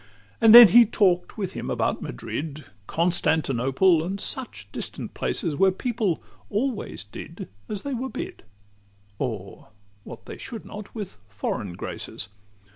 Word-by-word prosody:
XXIII 100 Hz, 0 st, -28 dB
And 225 Hz, 0 st, +9 dB
then 240 Hz, -2 st, +13 dB
he 240 Hz, +6 st, +9 dB
talk'd 195 Hz, -5 st, +2 dB
with 195 Hz, -4 st, -3 dB
him -, -, -5 dB
about -, -, 0 dB
Madrid, 145 Hz, -, -5 dB, 0.2 s
Constantinople, 160 Hz, -1 st, +2 dB
and 190 Hz, +4 st, -3 dB
such 195 Hz, -, -4 dB
distant -, -, -6 dB
places; 155 Hz, -, -1 dB
Where 190 Hz, +5 st, +5 dB
people 210 Hz, -3 st, -1 dB, 0.3 s
always 230 Hz, +2 st, -2 dB
did -, -, -9 dB, 0.2 s
as 205 Hz, -2 st, -4 dB
they 280 Hz, -, -3 dB
were 260 Hz, +2 st, -3 dB
bid, -, -, -6 dB, 0.8 s
Or 110 Hz, -7 st, -4 dB
did 100 Hz, -1 st, -20 dB
what -, -, -10 dB
they -, -, -9 dB
should 225 Hz, -3 st, -7 dB
not 210 Hz, +1 st, -9 dB
with 205 Hz, -, -6 dB
foreign 100 Hz, -1 st, -3 dB
graces. 100 Hz, +3 st, -6 dB
175 Hz, 145 wpm, -25 LUFS, -, 0.8 s, then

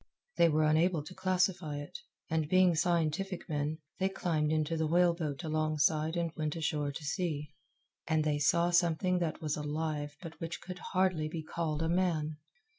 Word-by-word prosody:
They 170 Hz, -, +6 dB
were 155 Hz, 0 st, +2 dB
unable 155 Hz, +1 st, +3 dB
to 170 Hz, -, -10 dB
classify 180 Hz, -5 st, 0 dB
it, 145 Hz, 0 st, -7 dB, 0.3 s
and, 160 Hz, -2 st, -1 dB
being 185 Hz, -1 st, +5 dB
scientific 170 Hz, +3 st, 0 dB
men, 150 Hz, -1 st, -1 dB, 0.2 s
they 190 Hz, 0 st, +2 dB
climbed 155 Hz, -5 st, 0 dB
into 155 Hz, +1 st, +1 dB
the 160 Hz, -1 st, 0 dB
whale 175 Hz, +2 st, +4 dB
boat 155 Hz, -2 st, -4 dB
alongside 155 Hz, +1 st, +1 dB
and 170 Hz, -1 st, 0 dB
went 155 Hz, 0 st, -2 dB
ashore 150 Hz, -3 st, -1 dB
to 145 Hz, +3 st, -7 dB
see. 150 Hz, -1 st, -2 dB, 0.5 s
And 160 Hz, -1 st, +2 dB
they 150 Hz, -1 st, +1 dB
saw 170 Hz, +5 st, +3 dB
something 175 Hz, +1 st, +2 dB
that 170 Hz, -1 st, -2 dB
was 150 Hz, -1 st, 0 dB
alive 150 Hz, 0 st, -3 dB
but 165 Hz, -3 st, -10 dB
which 165 Hz, 0 st, -4 dB
could 180 Hz, 0 st, -8 dB
hardly 185 Hz, -4 st, +1 dB
be 160 Hz, 0 st, -5 dB
called 155 Hz, -1 st, -2 dB
a -, -, 0 dB
man. 165 Hz, -3 st, 0 dB
160 Hz, 175 wpm, -32 LUFS, 150-175 Hz, 0.5 s, They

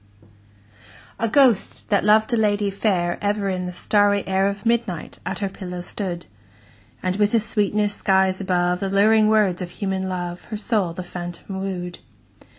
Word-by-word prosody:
A 230 Hz, -, +1 dB
ghost, 250 Hz, -4 st, +3 dB
that 200 Hz, -, +2 dB
loved 215 Hz, +3 st, +4 dB
a -, -, +5 dB
lady 205 Hz, -2 st, +1 dB
fair, 185 Hz, -4 st, 0 dB
Ever 205 Hz, -1 st, 0 dB
in 180 Hz, -1 st, -2 dB
the -, -, -4 dB
starry 205 Hz, +2 st, +2 dB
air 190 Hz, +1 st, +2 dB
Of 200 Hz, +1 st, -4 dB
midnight 230 Hz, -8 st, -1 dB
at -, -, -2 dB
her 200 Hz, -, -1 dB
pillow 180 Hz, -2 st, -7 dB
stood; 175 Hz, -2 st, -5 dB, 0.8 s
And, 185 Hz, +1 st, 0 dB
with 210 Hz, +2 st, +2 dB
a -, -, +5 dB
sweetness 210 Hz, -1 st, 0 dB
skies 190 Hz, -1 st, +2 dB
above 180 Hz, -1 st, +1 dB
The 195 Hz, -, -2 dB
luring 215 Hz, +2 st, +4 dB
words 210 Hz, -4 st, +2 dB
of 180 Hz, -, -4 dB
human 190 Hz, -1 st, -3 dB
love, 175 Hz, -1 st, -4 dB
Her 215 Hz, -, -5 dB
soul 205 Hz, -5 st, 0 dB
the 185 Hz, -, -6 dB
phantom 175 Hz, +2 st, -7 dB
wooed. 180 Hz, -2 st, -4 dB
195 Hz, 165 wpm, -22 LUFS, 180-210 Hz, 0.8 s, a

